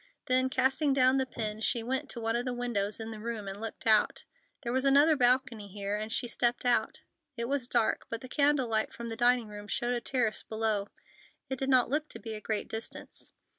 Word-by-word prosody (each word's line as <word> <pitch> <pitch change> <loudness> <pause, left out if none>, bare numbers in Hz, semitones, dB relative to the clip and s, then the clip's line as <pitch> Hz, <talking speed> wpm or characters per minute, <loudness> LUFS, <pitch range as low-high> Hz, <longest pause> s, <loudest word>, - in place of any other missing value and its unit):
Then, 255 0 +3
casting 270 +3 +2
down 260 0 +4
the 265 -1 0
pen, 215 -3 -3
she 230 +1 0
went 260 +3 -2
to 235 - -3
one 225 0 -1
of 240 - 0
the 250 -1 -3
windows 215 -4 -1
in 225 0 -5
the 220 - -7
room 220 -2 -5
and 195 +2 -6
looked 225 -1 -6
out. 220 -2 +3 0.4
There 235 -1 -2
was 260 0 +1
another 285 +3 +6
balcony 245 -4 +2
here, 200 +1 -3
and 215 +1 -4
she 245 +2 -1
stepped 240 +1 0
out. 245 -1 +1 0.4
It 235 0 -2
was 275 -2 -1
dark, 220 - +1
but 230 0 -4
the 255 - -8
candle 285 -1 +2
light 220 -1 0
from 235 0 -7
the 225 - -4
dining 240 0 +3
room 205 0 -9
showed 240 +4 -1
a 240 - -2
terrace 235 -4 0
below. 220 -2 -1 0.6
It 265 - -2
did 270 - -1
not 255 -2 +4
look 300 +1 -1
to - - -7
be 225 -2 -6
a 215 - -6
great 215 -1 -2
distance. 220 +1 -7
235 Hz, 225 wpm, -30 LUFS, 220-260 Hz, 0.6 s, another